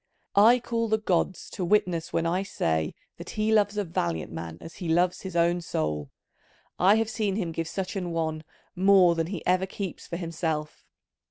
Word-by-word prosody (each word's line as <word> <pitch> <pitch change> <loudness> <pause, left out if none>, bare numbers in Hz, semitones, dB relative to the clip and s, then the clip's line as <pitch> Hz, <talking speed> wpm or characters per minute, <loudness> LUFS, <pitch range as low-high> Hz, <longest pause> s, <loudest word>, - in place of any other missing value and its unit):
I 220 +5 +7
call 230 -1 -1
the 220 0 +2
gods 185 -3 0
to 185 - -4
witness 175 -3 +1
when 165 - 0
I 175 +3 +1
say 80 - -1 0.2
that - - -9
he 215 +1 0
loves 210 -1 +3
a 205 - +1
valiant 85 - -2
man 80 0 -6
as 165 - -11
he 175 -4 -4
loves 175 +2 +2
his 190 -2 -7
own 170 +1 +2
soul: 75 - -2 0.7
I 190 +4 +6
have 225 0 +1
seen 215 -3 -1
him 180 -6 -2
give 165 0 -3
such 185 +2 -4
an 180 -3 -2
one 160 -2 -2 0.3
more 190 -1 +6
than 165 -1 -1
he 185 -2 -6
ever 185 +1 +2
keeps 190 -1 -6
for 170 - -4
himself. 160 -3 -3
175 Hz, 190 wpm, -27 LUFS, 165-200 Hz, 0.7 s, I